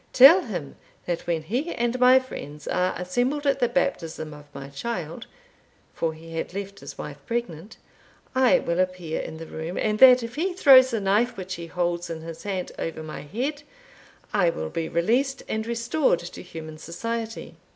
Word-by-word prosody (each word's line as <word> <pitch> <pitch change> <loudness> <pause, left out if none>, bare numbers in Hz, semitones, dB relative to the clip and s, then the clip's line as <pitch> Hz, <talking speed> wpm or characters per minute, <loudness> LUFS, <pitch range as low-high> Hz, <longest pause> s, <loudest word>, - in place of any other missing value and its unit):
Tell 280 +9 +9
him, 180 - -6 0.3
that 175 -1 -3
when 165 -2 0
he 250 - -2
and 240 +1 0
my 250 +1 +7
friends 150 - -5
are 180 0 +1
assembled 245 +11 -1
at 275 -1 +2
the 245 -2 +2
baptism 165 - -2
of 150 0 -12
my 140 -1 -8
child 170 +4 -5 0.7
(for 160 -1 -2
he 165 +1 -11
had 175 - -4
left 200 0 -5
his - - -9
wife - - -7
pregnant), 215 -6 -4 0.6
I 260 -1 +5
will 170 +1 -1
appear 185 -3 -1
in 160 - -7
the 165 - -7
room, 160 +3 -6
and 215 0 0
that 255 -2 +8
if 230 +1 -6
he 355 +6 -1
throws 265 -7 +8
the 230 -3 -1
knife 205 +5 +1
which 185 0 -5
he 170 -2 -6
holds 175 0 -2
in 165 -1 -5
his 165 0 -8
hand 190 -3 -3
over 160 -1 -4
my 155 - -7
head, 260 - -3 0.7
I 180 -5 +4
will 80 - -4
be 165 -1 -3
released 245 +10 +1
and 220 +1 -2
restored 235 - +1
to 175 - -8
human 160 -3 -9
society.' 225 +7 -5
195 Hz, 180 wpm, -25 LUFS, 165-245 Hz, 0.7 s, Tell